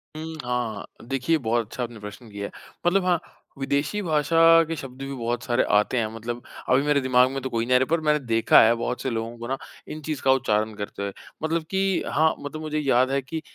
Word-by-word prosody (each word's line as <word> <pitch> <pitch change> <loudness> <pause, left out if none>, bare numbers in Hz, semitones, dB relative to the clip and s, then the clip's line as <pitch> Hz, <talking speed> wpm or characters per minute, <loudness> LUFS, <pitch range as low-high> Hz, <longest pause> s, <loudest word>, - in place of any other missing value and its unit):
हुँ, 160 +1 -6
हाँ। 125 -2 -2 0.2
देखिए, 135 +5 +1
बहुत 115 -3 0
अच्छा 125 +3 -5
आपने 120 -2 -7
प्रश्न 105 +3 -10
किया 100 0 -5
है। - - -12 0.4
मतलब 185 +1 +3
हाँ, 175 -2 +3 0.4
विदेशी 140 +9 0
भाषा 165 0 +5
के 165 - -3
शब्द 135 -3 -9
भी 135 0 -4
बहुत 120 -1 -2
सारे 120 0 +2
आते 105 +5 +3
हैं। 115 -2 +1
मतलब 120 +2 -5 0.3
अभी 130 +1 +5
मेरे 145 -1 +2
दिमाग 130 -1 +4
में 135 0 -3
तो 130 - -3
कोई 115 -1 -1
नहीं 125 +1 +3
आ - - +8
रहें, 130 - +1
पर 165 +1 +1
मैंने 150 -1 +2
देखा 115 -4 +5
है 115 +1 +6
बहुत 125 +2 -3
से 130 - -1
लोगों 115 0 -4
को 120 0 -7
ना 135 +2 -1 0.3
इन 155 - -7
चीज़ 150 -2 -4
का 135 - +4
उच्चारण 110 -5 +1
करते 100 -1 -6
हुए। 100 - -3 0.3
मतलब 160 +1 0
कि 195 -1 +1
हाँ, 160 +2 +3
मतलब 145 +2 -6
मुझे 155 -1 -2
याद 130 -2 +2
है 140 0 +1
कि 155 +5 -5
130 Hz, 235 wpm, -25 LUFS, 120-155 Hz, 0.4 s, आ